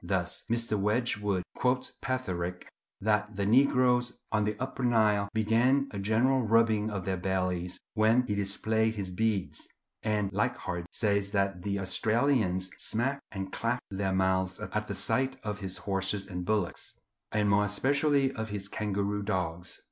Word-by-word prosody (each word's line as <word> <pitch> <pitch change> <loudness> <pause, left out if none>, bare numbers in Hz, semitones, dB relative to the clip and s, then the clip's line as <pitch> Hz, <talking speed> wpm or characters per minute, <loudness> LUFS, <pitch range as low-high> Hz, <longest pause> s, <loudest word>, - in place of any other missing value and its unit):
Thus - - -1
Mr. 115 -2 0
Wedgwood 105 -3 0
quotes 125 0 0
Petherick 90 -9 -3 0.3
that 105 0 0
the 100 0 -1
negroes 125 +1 +3
on 105 -1 +2
the 105 0 -2
Upper 130 0 -4
Nile 105 -4 +3
began 120 +6 +2
a 100 - -5
general 115 +6 +2
rubbing 110 -1 +3
of 100 -4 -4
their 95 -1 -1
bellies 90 -1 -1
when 110 +3 +3
he 105 - -1
displayed 110 +3 +1
his 95 -3 -4
beads; 105 0 -1 0.3
and 105 -3 0
Leichhardt 90 -3 -2
says 100 -3 0
that 95 -2 0
the 100 +1 -2
Australians 100 -2 +1
smacked 135 +5 -1
and 95 -2 -5
clacked 120 +2 -2
their 95 0 -1
mouths 95 0 +1
at - - -3
the - - -4
sight 130 0 0
of 105 -2 -3
his 95 -2 -3
horses 95 0 -1
and 90 -2 -5
bullocks, 105 -4 -1 0.4
and 105 -1 +1
more 100 +1 +4
especially 140 +6 +2
of 110 -4 -5
his 100 -1 -4
kangaroo 105 0 -2
dogs. 90 -3 -3
105 Hz, 150 wpm, -29 LUFS, 95-115 Hz, 0.4 s, more